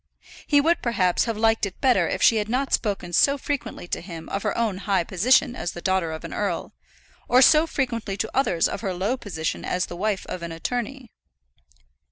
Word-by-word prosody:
He 290 - +5
would 330 +4 +2
perhaps 185 -7 +1
have 230 -3 -3
liked 225 -1 +2
it 185 - -11
better 260 -3 +3
if - - -2
she 225 - +6
had 210 0 -2
not 265 +3 -1
spoken 195 -5 -1
so 280 - +4
frequently 280 -9 -4
to - - -3
him 165 -2 -9
of 195 - -2
her 210 -1 -2
own 220 -5 0
high 200 -3 +1
position 240 +8 +2
as 175 - -4
the - - -7
daughter 185 -3 0
of 160 -1 -7
an - - -7
earl, - - -3 0.5
or 250 - +5
so 310 +4 +6
frequently 230 -9 -2
to - - -3
others 215 -11 +2
of - - -5
her 190 -4 -2
low 195 +8 0
position 175 -10 -4
as 180 0 -1
the 175 - -8
wife 200 +1 -1
of 180 - -6
an 170 0 -5
attorney. 245 +8 -4
210 Hz, 210 wpm, -24 LUFS, 180-250 Hz, 0.5 s, she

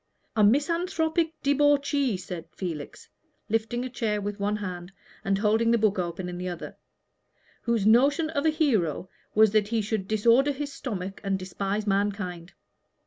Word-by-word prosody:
"A 215 - +4
misanthropic 325 - +1
debauchee," 285 -4 +2
said 180 -2 -7
Felix, 165 -6 -6 0.4
lifting 225 +3 -1
a - - -2
chair 220 -4 -1
with 205 0 -4
one 205 +1 0
hand, 180 -3 -6 0.3
and 195 -2 +1
holding 220 +3 +2
the 235 - +4
book 210 -3 +1
open 180 +1 -3
in 175 0 -6
the 180 0 -3
other, 175 -2 -7 0.9
"whose 230 -4 0
notion 280 +8 +4
of 285 -3 -1
a 320 - +4
hero 220 - 0 0.3
was 215 -1 +6
that 215 -1 +2
he 230 +1 0
should 210 -2 -2
disorder 235 +7 +3
his 285 +1 -5
stomach 195 -6 -5
and 195 -1 0
despise 195 +2 -3
mankind. 195 -3 -2
215 Hz, 155 wpm, -27 LUFS, 195-270 Hz, 0.9 s, was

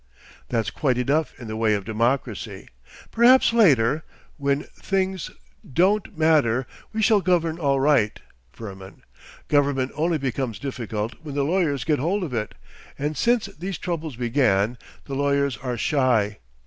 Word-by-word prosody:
That's 115 -1 -1
quite 130 -5 0
enough 140 +3 0
in 120 - -8
the 110 - -4
way 110 -1 +2
of 100 -2 -4
democracy. 115 -1 -2 0.4
Perhaps 240 +1 +5
later—when 140 - +1
things 190 -2 -2 0.3
don't 185 +6 +1
matter.... 145 -6 +3 0.3
We 220 0 -1
shall 215 -2 +4
govern 170 -3 +1
all 140 -3 +2
right, 135 -7 +2 0.3
Firmin. 95 -3 -10 0.4
Government 140 -3 +1
only 160 +2 0
becomes 130 -5 -3
difficult 115 -3 -4
when 150 -3 -7
the 140 - +1
lawyers 160 -4 +1
get 150 -3 +1
hold 185 +8 0
of 150 -7 -5
it, 110 -2 -3 0.4
and 150 +2 -2
since 235 - +2
these 185 +3 -6
troubles 165 -5 -4
began 120 -3 +1 0.3
the 140 - -7
lawyers 140 -1 +1
are 125 -2 -4
shy. 120 -9 +1
140 Hz, 140 wpm, -24 LUFS, 120-165 Hz, 0.4 s, Perhaps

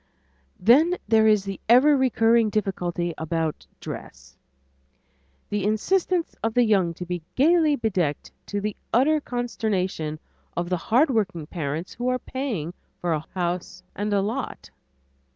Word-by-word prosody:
Then 305 - +5
there 220 -1 +5
is 210 -2 +4
the 195 -1 -6
ever 270 +5 +7
recurring 235 -4 +3
difficulty 180 -4 -2
about 160 -1 -2
dress; 65 +1 -9 1.1
the 205 -1 -1
insistence 340 - 0
of 225 0 -1
the 245 - +5
young 190 -7 +2
to 180 - -6
be 175 -1 -4
gayly 310 +1 +4
bedecked 180 - -1 0.2
to 205 - -2
the 210 0 -3 0.2
utter 295 +6 +3
consternation 195 - -2 0.4
of 175 0 -1
the 180 - +1
hardworking 220 - +2
parents 155 +1 -4
who 245 +1 -3
are 255 0 +2
paying 240 - -4 0.3
for 175 -2 0
a 155 0 -3
house 180 -1 -3
and 205 +2 -2
lot. 205 +6 -2
210 Hz, 135 wpm, -24 LUFS, 175-245 Hz, 1.1 s, ever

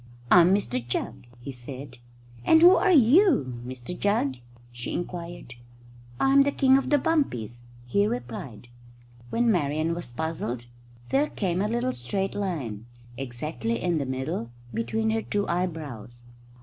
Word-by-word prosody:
"I'm 175 0 +7
Mr 125 -11 -2
Jugg," 120 0 -4
he 140 - -6
said. 125 0 -9 0.4
"And 320 - +5
who 360 +2 +9
are 375 +1 +3
you, 260 - +4
Mr 125 +5 -7
Jugg?" 180 - 0 0.3
she 120 0 -6
inquired. 175 -6 -6 0.7
"I'm 275 +1 +5
the 285 +1 +3
King 265 -1 +4
of 270 - +1
the 290 - +5
Bumpies," 125 - -1 0.2
he 200 +12 +2
replied. 120 - -6 0.6
When 235 - +2
Marian 155 -2 0
was 170 -7 -5
puzzled 125 -4 -3 0.5
there 285 +2 +3
came 185 -2 -1
a 205 - +1
little 240 +3 -1
straight 190 +11 -2
line, 135 - -4 0.3
exactly 120 -2 -3
in 170 +1 0
the 140 - -3
middle, 130 -1 -3 0.2
between 220 - -1
her 225 0 0
two 205 -2 -2
eyebrows. 150 - -4
160 Hz, 140 wpm, -26 LUFS, -, 0.7 s, who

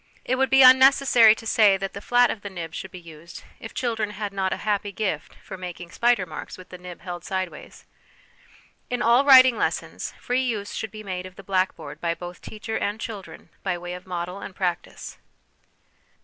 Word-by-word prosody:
It 255 - +1
would 265 0 +2
be 270 0 +6
unnecessary 260 -3 +7
to 225 - -12
say 215 -4 +4
that 195 0 -5
the 200 - -7
flat 245 +2 +3
of 210 - -6
the 205 - -6
nib 170 -4 -7
should 190 - -6
be 180 - -10
used 165 -1 -12 0.2
if 225 - -8
children 225 -4 -2
had 205 -1 -5
not 190 -1 -1
a - - -1
happy 205 -1 0
gift 210 0 -3
for 190 - -9
making 175 -1 -8
spider 235 -5 +2
marks 155 -3 -8
with 185 0 -13
the 180 - -10
nib 180 -1 -10
held 175 -2 -7
sideways. 185 -5 -6 1.0
In 245 0 -1
all 240 +4 +5
writing 260 -3 +8
lessons, - - -3
free 250 +1 0
use 220 -6 -3
should 220 - -4
be 215 +1 -10
made 185 -2 -5
of 185 - -15
the 195 - -12
black 190 0 0
board - - -10
by 170 -1 -1
both 175 0 -9
teacher 220 +1 -5
and 205 +2 -2
children 210 -4 -8
by 185 -2 -2
way 175 0 -7
of 180 +1 -10
model 180 +1 -4
and 190 - -8
practice. 180 -3 -4
200 Hz, 205 wpm, -24 LUFS, 180-230 Hz, 1.0 s, writing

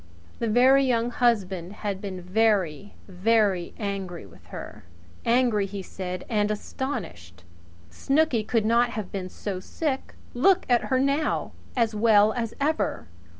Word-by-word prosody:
The 230 - -1
Very 260 +5 +5
Young 240 -2 +1
Husband 195 -8 0
had 200 -2 -4
been 185 -3 -6
very, 200 -3 +1
very 195 -1 +1
angry 195 - -4
with 85 -3 -18
her - - -9 0.4
angry 235 -4 +3
and - - -8
hurt, - - -8
he 195 - -4
said, 185 -1 -6
and 210 -3 +1
astonished! 170 - -5 0.5
Snooky 275 - +1
could 225 0 0
not 235 +2 +3
have 215 -5 -5
been 185 -2 -4
so 190 0 -5
sick! 270 - -3 0.2
Look 375 +9 +3
at 240 -2 +3
her 260 -1 +1
now! 280 +3 0 0.3
As 230 -2 +2
well 215 -1 +4
as 230 -2 -3
ever. 300 - -1
215 Hz, 150 wpm, -26 LUFS, 190-245 Hz, 0.5 s, Very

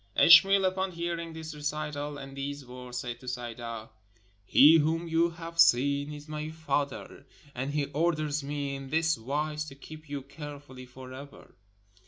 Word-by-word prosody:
Ishmael, 195 +3 +8
upon 185 0 -1
hearing 170 0 -3
this 160 0 -7
recital 150 -1 -4
and 135 -1 -9
these 140 0 -5
words, 125 0 -8
said 120 -1 -5
to 125 - -14
Sayda: 120 -2 -5 0.6
"He 155 +4 +7
whom 165 +3 0
you 165 +1 +2
have 165 0 -9
seen 140 +1 +4
is 150 0 -9
my 155 0 -4
father, 145 -3 -3 0.3
and 130 +3 -3
he 145 -1 0
orders 150 0 0
me 140 -1 -3
in 135 -1 -8
this 160 +2 +2
wise 150 +6 -2
to 135 -3 -10
keep 155 +2 -12
you 140 -2 -4
carefully 140 -2 -10
for 130 +1 -11
ever." 140 +2 -12
145 Hz, 160 wpm, -29 LUFS, 135-160 Hz, 0.6 s, Ishmael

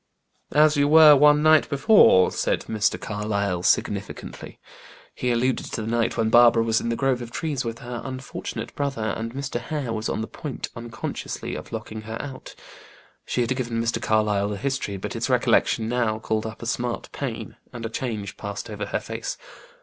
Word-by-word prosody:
"As 150 0 +5
you 145 0 +3
were 155 0 +9
one 150 +1 +5
night 155 -1 +5
before," 140 - +5
said - - 0
Mr. 110 -2 0
Carlyle, 100 -4 -2
significantly. - - -2 0.6
He 125 - -2
alluded 125 +2 0
to - - -2
the - - -5
night 115 0 0
when 110 -1 +1
Barbara 120 -1 +6
was 115 -1 +1
in 115 - -2
the 115 - 0
grove 130 -1 0
of 120 - -6
trees 140 +1 -3
with 115 -1 -4
her 120 -1 -5
unfortunate 130 0 -6
brother, 135 -7 -2
and 115 +2 -5
Mr. 135 -3 -3
Hare 130 -2 -3
was 110 0 -3
on - - -2
the 110 - -4
point, 145 -4 -6
unconsciously, 115 -2 -5
of - - -7
locking 110 0 -6
her 110 +1 -6
out. 135 -2 -8 0.7
She 125 - 0
had 120 +2 0
given 120 -3 -2
Mr. 115 0 -1
Carlyle 105 -2 +1
the 105 - -3
history, 130 -5 -2
but - - -5
its - - -2
recollection 110 - +2
now 115 -2 0
called 110 0 -2
up 110 +1 -9
a - - -5
smart 120 0 -2
pain, - - -5
and 115 -1 -7
a - - -3
change 110 -5 -4
passed 100 0 -6
over - - -4
her - - -1
face. - - -5
115 Hz, 190 wpm, -24 LUFS, 110-135 Hz, 0.7 s, were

